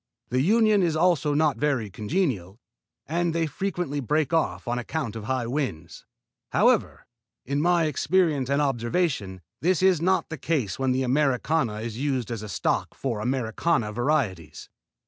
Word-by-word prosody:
The 125 +2 +1
union 215 - +4
is 170 -3 +1
also 155 -3 +2
not 150 -5 +2
very 130 -7 0
congenial, 110 - -2 0.5
and 170 +1 -1
they 165 -1 +1
frequently 175 -2 -3
break 150 +3 0
off 160 -5 0
on 120 +1 -1
account 120 -2 -4
of 110 -2 -6
high 130 -1 -1
winds. 115 - -4 0.5
However, - - +2 0.4
in 140 +3 -1
my 175 0 +3
experience 155 -2 +1
and 140 +1 +2
observation, 120 - -1 0.2
this 185 +2 +2
is 185 -4 +4
not 185 +2 +1
the 160 -3 -6
case 135 - -1
when 130 -1 +1
the 130 +1 +1
Americana 130 -3 +1
is 115 0 -5
used 130 -5 -1
as 115 -3 -4
a 105 - -7
stock - - -1
for 120 -6 -3
Americana 120 +1 0
varieties. 120 - -1
140 Hz, 155 wpm, -25 LUFS, 115-165 Hz, 0.5 s, union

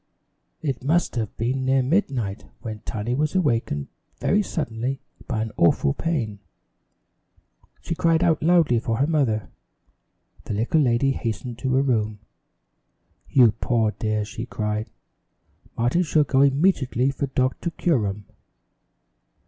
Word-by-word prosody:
It 135 -4 -2
must 160 +3 +1
have 110 -4 -3
been 130 +4 -1
near 135 0 +3
midnight 125 - -1 0.2
when 110 -2 -6
Tiny 110 +2 -3
was 150 +5 0
awakened 115 - 0 0.3
very 205 - +2
suddenly 130 - -3 0.3
by 110 -4 -1
an 110 - -5
awful 70 -4 +3
pain. 120 -12 -2 1.4
She 170 - -3
cried 165 +1 +2
out 165 -3 +2
loudly 160 -7 +4
for 115 -1 -2
her 135 - +3
mother. 130 - 0 1.0
The 105 - -3
little 120 +9 +2
lady 130 +1 +2
hastened 120 0 -4
to 130 +1 0
her 135 - +3
room. 110 -5 0 1.1
"You 125 -5 +6
poor 115 0 0
dear!" 110 -1 -2
she 110 +3 -6
cried. 105 -1 -3 0.9
"Martin 120 +9 +2
shall 155 -3 +3
go 135 -1 +2
immediately 140 -3 +2
for 140 +1 -3
Doctor 130 +5 -1
Curum." 105 - 0
125 Hz, 130 wpm, -24 LUFS, 110-145 Hz, 1.4 s, You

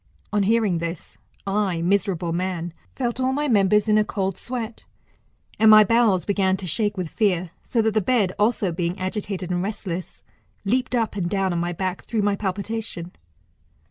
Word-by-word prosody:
On 205 - +3
hearing 205 -4 +2
this, 170 0 -6 0.3
I, 195 -4 0
miserable 180 -2 0
man, 175 -1 -2 0.2
felt 240 -1 -2
all 260 0 +1
my 295 +2 0
members 210 -2 +3
in 215 0 +4
a - - +4
cold 195 -3 -2
sweat, 235 -1 -5 0.8
and 220 - +6
my 215 0 +9
bowels 210 -5 +3
began 190 -2 +1
to 190 - -7
shake 205 +4 0
with 180 -2 -2
fear; 185 -3 0 0.2
so 230 -2 +1
that 220 -1 +1
the 215 - +2
bed 210 -3 +2
also 210 -3 +2
being 170 +2 -2
agitated 190 -1 -3
and 175 0 0
restless, 185 -3 -5 0.4
leaped 250 +4 +1
up 225 -3 0
and 180 -4 -1
down 195 -2 0
on 170 - -1
my 175 +1 -1
back 185 +1 -3
through 220 -3 -1
my 205 0 +2
palpitation. 200 -2 -4
200 Hz, 175 wpm, -23 LUFS, 180-220 Hz, 0.8 s, my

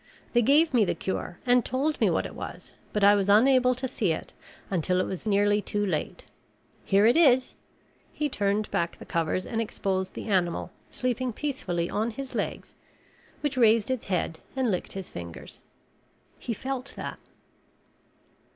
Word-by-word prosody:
They 240 - +5
gave 295 +6 +4
me 235 -3 +5
the 195 - 0
cure 185 -2 -4
and 245 -1 +4
told 290 +4 -1
me - - +5
what - - 0
it - - -7
was, - - -8 0.2
but 210 - -1
I 200 +1 +8
was 200 -1 +1
unable 255 +4 +5
to 260 +2 -3
see 205 -7 0
it 160 - -4 0.4
until 180 0 +1
it 185 - +1
was 190 +4 -5
nearly 205 0 +3
too 205 0 -1
late. 190 - -3 0.6
Here 200 +1 +4
it 235 - +5
is." 260 -6 +5 0.6
He 300 - -1
turned 205 -4 -1
back 170 0 -1
the - - -11
covers 165 +2 -1
and 225 - -3
the - - +2
exposed 190 -3 -3
animal 185 -5 0 0.2
sleeping 250 0 -2
peacefully 190 - -2
on 220 +5 -1
his 265 +3 -7
legs - - -4 0.7
which 285 -3 -1
raised 230 -1 +4
its 255 -3 -2
head 175 -3 -1 0.2
and 260 -4 +1
licked 180 - -3
his 195 -2 -6
fingers. 85 -1 -9 0.8
He - - -4
felt 265 +3 -4
that. - - -6
215 Hz, 170 wpm, -27 LUFS, 190-255 Hz, 0.8 s, I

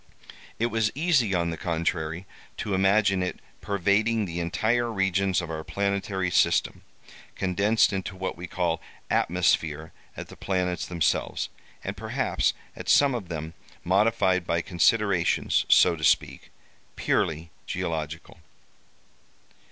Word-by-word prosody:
It 115 - +1
was 110 -1 +1
easy, 140 - +2
on 85 -1 0
the 85 - -5
contrary, 85 0 -2 0.3
to 105 - -3
imagine 95 0 +3
it 90 - -3 0.2
pervading 100 +3 +1
the 85 -1 -5
entire 115 +8 0
regions 95 -2 +1
of 85 -2 -6
our 80 0 -4
planetary 100 -1 -1
system, - - +2 0.5
condensed 100 +4 +2
into 95 -1 -4
what 95 0 -4
we 90 +1 -7
call 85 -2 -1 0.3
atmosphere 80 -3 +1 0.2
at - - -7
the - - -11
planets 90 -2 -2
themselves, 85 -3 -1 0.3
and - - -4
perhaps - - -1 0.2
at - - -7
some 140 -2 +5
of 115 -7 -4
them 80 -1 -5 0.3
modified 95 -2 +2
by 85 0 +1
considerations, 95 -1 +2
so 90 - +6
to 80 - -9
speak, - - +1 0.5
purely 80 +1 -1 0.2
geological. 80 +1 -4
95 Hz, 125 wpm, -26 LUFS, 85-100 Hz, 0.5 s, so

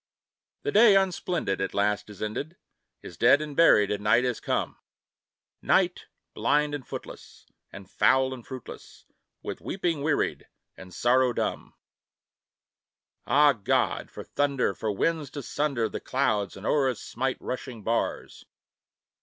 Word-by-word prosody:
The - - -1
day, 215 -1 +6
unsplendid, 180 - 0
at 95 - -3
last 105 +1 0
is 105 0 -8
ended, 140 +11 -4 0.5
Is 85 - -10
dead 125 +7 +5
and 150 -2 -6
buried, 105 -11 +5
and 105 0 -3
night 115 +4 +4
has 125 -2 -1
come; - - -2 0.8
Night, - - +1 0.3
blind 150 +1 +1
and 145 -3 -6
footless, - - -10 0.3
and 95 -1 -11
foul 130 +5 +2
and 125 -2 -9
fruitless, 130 -2 -11 0.4
With - - -6
weeping 170 -6 -2
wearied, 150 0 -1 0.3
and 95 -1 -12
sorrow 125 +5 +2
dumb. - - -3 1.5
Ah, 145 0 +5
God! 105 -5 0
for - - -9
thunder! 140 -7 0
for 105 +4 -3
winds 155 +7 -1
to 145 0 -7
sunder 135 -6 -1
The - - -6
clouds 110 -8 -1
and 95 - -10
o'er 140 -3 +2
us 125 - -4
smite 130 +2 -3
rushing 125 -3 -6
bars! 115 +2 -2
130 Hz, 140 wpm, -27 LUFS, 105-145 Hz, 1.5 s, day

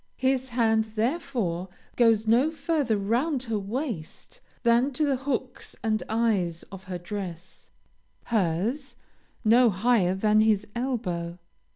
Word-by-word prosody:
His 260 0 0
hand, 225 -2 +2
therefore, 220 - -1 0.3
goes 225 -2 +4
no 240 +7 +4
further 290 -7 0
round 245 +8 0
her 225 -4 -2
waist 230 - -5 0.2
than 235 +3 +3
to 300 +4 +1
the 280 -2 +2
hooks 260 -1 -4
and 220 -1 +1
eyes 205 -7 0
of 190 -1 -10
her 185 -1 -4
dress, 180 -1 -7 0.5
hers, 220 - -1 0.5
no 235 +2 +6
higher 195 -2 +2
than 210 +2 +3
to 215 - +5
his 210 -2 +2
elbow. 185 -9 -2
225 Hz, 130 wpm, -26 LUFS, 195-255 Hz, 0.5 s, no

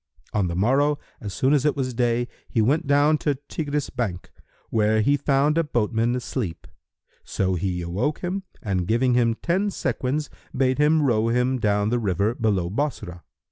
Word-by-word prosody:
On 100 -4 +1
the 85 - -3
morrow, 135 +9 +2 0.2
as 105 - -6
soon 130 +8 +1
as 145 -3 +3
it 150 -1 +2
was 130 -3 -2
day, 120 0 +1 0.2
he 115 - -1
went 135 +8 +2
down 145 +2 +4
to 145 -2 0
Tigris 145 +1 -4
bank, 105 -8 -4 0.4
where 110 0 +2
he 140 +7 +3
found 145 +2 +2
a - - +3
boatman 120 -3 0
asleep; 120 -7 -4 0.6
so 95 -1 -1
he 90 0 -2
awoke 105 - -2
him 185 +2 -2 0.2
and 95 -4 -1
giving 125 +3 +2
him 120 -2 +2
ten 185 - 0
sequins, 135 - -2 0.3
bade 130 +1 +2
him 150 +1 +4
row 115 -5 +2
him 125 +2 +1
down 105 -1 +1
the 120 +1 +1
river 100 +1 0
below 105 -7 0
Bassorah. 100 -6 -3
120 Hz, 175 wpm, -24 LUFS, 105-145 Hz, 0.6 s, down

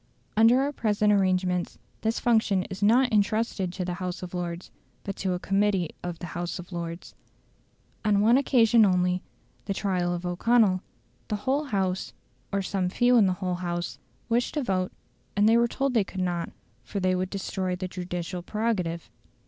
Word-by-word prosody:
Under 225 +4 +6
our 280 +1 0
present 210 -3 +2
arrangements 185 -2 +1 0.2
this 225 +1 0
function 220 -5 +2
is 190 +2 -6
not 240 +4 +4
entrusted 210 -2 +1
to 185 -1 -3
the 180 - -2
House 180 0 -4
of 180 - -7
Lords, 175 0 -4 0.3
but 195 - -4
to 190 -2 -1
a 180 - -2
Committee 195 -3 +1
of 175 -1 -5
the 175 - -7
House 175 0 -3
of 180 +1 -10
Lords. 170 0 -6 0.9
On 210 -2 +3
one 225 +4 +5
occasion 240 -4 +5
only, 180 -2 +2 0.4
the 195 - -2
trial 180 -3 0
of 175 0 -3
O'Connell, 185 +1 +3 0.5
the 210 - -1
whole 280 +3 +1
House, 190 -7 -1 0.4
or 200 0 0
some 185 -1 -1
few 245 +5 +3
in 215 -5 +6
the 185 - +2
whole 180 - 0
House, 175 -1 -3 0.3
wished 240 +4 0
to 295 - 0
vote, 185 -4 0 0.5
and 205 +1 +5
they 225 - +6
were 235 0 +4
told 275 +2 -1
they 225 -4 +4
could 190 0 -8
not, 175 -2 -1 0.5
or - - +2
they 185 -1 +2
would 185 0 -1
destroy 190 -2 -2
the 185 +1 -4
judicial 180 -1 -5
prerogative. 180 -4 -2
190 Hz, 180 wpm, -27 LUFS, 180-220 Hz, 0.9 s, Under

